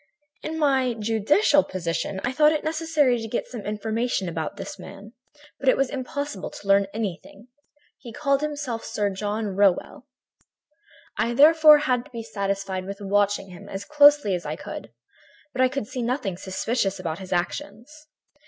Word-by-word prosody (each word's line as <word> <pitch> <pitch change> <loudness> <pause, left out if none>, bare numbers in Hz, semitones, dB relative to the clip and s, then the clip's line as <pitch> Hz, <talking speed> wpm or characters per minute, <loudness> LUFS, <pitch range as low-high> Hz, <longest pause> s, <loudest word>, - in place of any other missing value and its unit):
"In 320 +1 -4
my 265 -5 +2
judicial 225 - +3
position 185 +2 -3
I 250 - 0
thought 300 +3 +4
it 305 - -2
necessary 310 -6 +1
to 225 - -5
get 230 - -2
some 240 -4 -8
information 215 0 -2
about 160 -2 -4
this - - -7
man, 210 +3 -11 0.5
but 270 - +2
it - - +4
was 275 -1 +1
impossible 280 -5 -4
to 200 - -12
learn 195 0 +4
anything. 210 +2 -6 0.5
He 240 - -10
called 275 +2 0
himself 290 -6 -3
Sir 205 -1 -1
John 205 +1 -3
Rowell. 200 +6 +1 1.1
"I 235 +1 0
therefore 305 +2 +8
had 250 -4 0
to - - -16
be 230 -2 -6
satisfied 195 -3 -3
with 200 +1 -7
watching 200 -1 0
him 200 +3 -12
as 195 +1 -6
closely 290 -7 +5
as 175 -1 -2
I 150 - -4
could, - - -8 0.6
but 255 - -1
I 255 - +5
could 270 -3 -3
see 250 +4 -5
nothing 235 -5 -2
suspicious 195 +2 -2
about 165 -2 -4
his 190 -1 -10
actions. 225 +11 -4
225 Hz, 165 wpm, -24 LUFS, 195-275 Hz, 1.1 s, therefore